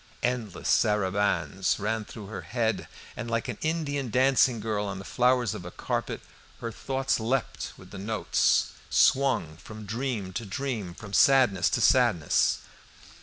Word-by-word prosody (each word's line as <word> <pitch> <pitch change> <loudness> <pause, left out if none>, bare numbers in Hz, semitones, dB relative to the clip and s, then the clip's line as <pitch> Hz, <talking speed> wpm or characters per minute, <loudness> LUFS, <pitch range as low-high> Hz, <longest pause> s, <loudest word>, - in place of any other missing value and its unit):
Endless 120 -5 -2
sarabands 95 -4 +1
ran 110 +1 -2
through 105 -1 -9
her 95 -2 -6
head, 110 +6 -1 0.3
and, 120 - -5
like 115 0 -1
an - - -5
Indian 145 -5 -1
dancing 130 0 +3
girl 105 -1 -2
on 100 -1 -4
the 95 - -8
flowers 125 -3 +2
of - - -7
a 90 - -7
carpet, - - -3 0.4
her 115 - -4
thoughts 135 +3 -1
leapt 120 +3 -2
with - - -15
the - - -8
notes, 110 +2 +1 0.2
swung 125 - +3
from 110 +4 -10
dream 110 -3 -3
to 115 - -3
dream, 105 -4 -4
from 105 0 -10
sadness 120 - +5
to - - 0
sadness. - - +3
110 Hz, 150 wpm, -27 LUFS, 100-125 Hz, 0.4 s, sadness